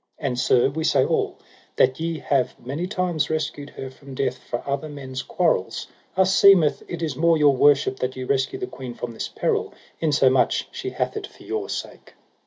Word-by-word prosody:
And 125 Hz, -, -2 dB
sir, 125 Hz, -, +4 dB
we 160 Hz, +3 st, -3 dB
say -, -, +3 dB
all, -, -, 0 dB, 0.4 s
that 130 Hz, +2 st, +3 dB
ye 165 Hz, 0 st, -2 dB
have 140 Hz, -4 st, 0 dB
many 145 Hz, +8 st, -4 dB
times 175 Hz, -6 st, -1 dB
rescued 150 Hz, -2 st, -3 dB
her 135 Hz, -1 st, -8 dB
from 135 Hz, 0 st, -12 dB
death 135 Hz, +1 st, -1 dB
for 120 Hz, -, -6 dB
other 140 Hz, +2 st, -2 dB
men's 130 Hz, -3 st, -6 dB
quarrels, 165 Hz, -, 0 dB, 0.3 s
us 190 Hz, 0 st, +4 dB
seemeth 185 Hz, -7 st, +6 dB
it 170 Hz, -1 st, -5 dB
is 155 Hz, -5 st, -2 dB
more 165 Hz, +3 st, +3 dB
your 145 Hz, -2 st, +5 dB
worship 140 Hz, -1 st, +4 dB
that 130 Hz, +1 st, -2 dB
ye 130 Hz, -, -5 dB
rescue 135 Hz, -, 0 dB
the 385 Hz, -, -3 dB
queen 130 Hz, -, -8 dB
from 120 Hz, 0 st, -5 dB
this 115 Hz, -, -4 dB
peril, -, -, -1 dB, 0.2 s
insomuch 140 Hz, -4 st, +3 dB
she -, -, -5 dB
hath -, -, -2 dB
it 425 Hz, -2 st, -4 dB
for -, -, -18 dB
your 425 Hz, -1 st, -3 dB
sake. -, -, -7 dB
145 Hz, 195 wpm, -23 LUFS, 130-165 Hz, 0.4 s, seemeth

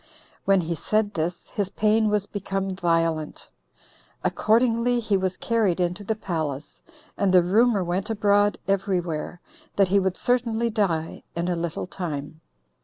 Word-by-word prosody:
When 195 Hz, -1 st, +4 dB
he 170 Hz, 0 st, -2 dB
said 215 Hz, +5 st, 0 dB
this, 170 Hz, +1 st, -3 dB
his 200 Hz, -2 st, -2 dB
pain 215 Hz, +2 st, +2 dB
was 210 Hz, -1 st, +1 dB
become 195 Hz, -1 st, -3 dB
violent. 165 Hz, -3 st, -1 dB, 0.7 s
Accordingly 235 Hz, +2 st, +2 dB
he 215 Hz, -3 st, 0 dB
was 185 Hz, -1 st, -1 dB
carried 215 Hz, -7 st, +1 dB
into 180 Hz, +3 st, -1 dB
the 220 Hz, +2 st, -1 dB
palace, 155 Hz, -8 st, -4 dB, 0.4 s
and 200 Hz, -2 st, +3 dB
the 180 Hz, -1 st, +6 dB
rumor 210 Hz, +2 st, +3 dB
went 180 Hz, +4 st, -2 dB
abroad 205 Hz, -1 st, +2 dB
every 195 Hz, -1 st, +1 dB
where, 170 Hz, +1 st, -5 dB, 0.3 s
that 195 Hz, -2 st, +3 dB
he 200 Hz, +1 st, +4 dB
would 190 Hz, -1 st, -1 dB
certainly 235 Hz, -2 st, +1 dB
die 170 Hz, -7 st, -1 dB
in 170 Hz, +1 st, -1 dB
a 175 Hz, -, 0 dB
little 170 Hz, -1 st, -3 dB
time. 160 Hz, -4 st, -6 dB
195 Hz, 150 wpm, -25 LUFS, 170-215 Hz, 0.7 s, the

